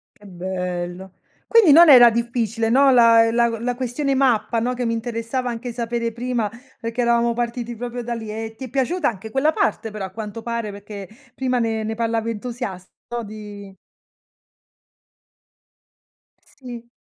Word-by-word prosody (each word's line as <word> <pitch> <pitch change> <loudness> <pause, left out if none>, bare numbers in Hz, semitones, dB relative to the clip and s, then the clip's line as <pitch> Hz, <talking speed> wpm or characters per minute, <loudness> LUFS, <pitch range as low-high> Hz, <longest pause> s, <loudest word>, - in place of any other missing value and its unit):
Che 210 - -19
bello. 180 0 -5 0.3
Quindi 455 -9 +6
non 335 +3 +8
era 245 -4 +9
difficile, 230 -1 -1
no, 270 +3 +5
la 230 -2 +6
la 235 0 +3
la 245 +2 -1
questione 260 +3 -2
mappa, 235 -4 +2
no, 245 +2 -1
che 245 0 -2
mi 230 - 0
interessava 230 +2 -3
anche 240 +1 -5
sapere 235 0 -2
prima, 235 -2 -2 0.3
perché 230 +1 -3
eravamo 235 0 +2
partiti 240 0 -3
proprio 245 +1 -5
da 240 0 -3
lì 225 -2 -6
e 220 +1 -5
ti 260 - -7
è - - -10
piaciuta 280 +6 0
anche 220 -1 -8
quella 270 +6 +2
parte 390 - -1
però, 210 -2 -5
a 190 - -9
quanto 220 +2 -7
pare, 235 -3 -3
perché 200 -1 -9 0.3
prima 255 -1 -1
ne 225 -2 -1
ne 220 +1 -3
parlava 230 0 -1
entusiasta 225 -4 -6 0.3
di 205 -2 -10 2.7
Sì. 240 -3 -11
230 Hz, 155 wpm, -21 LUFS, 220-245 Hz, 2.7 s, era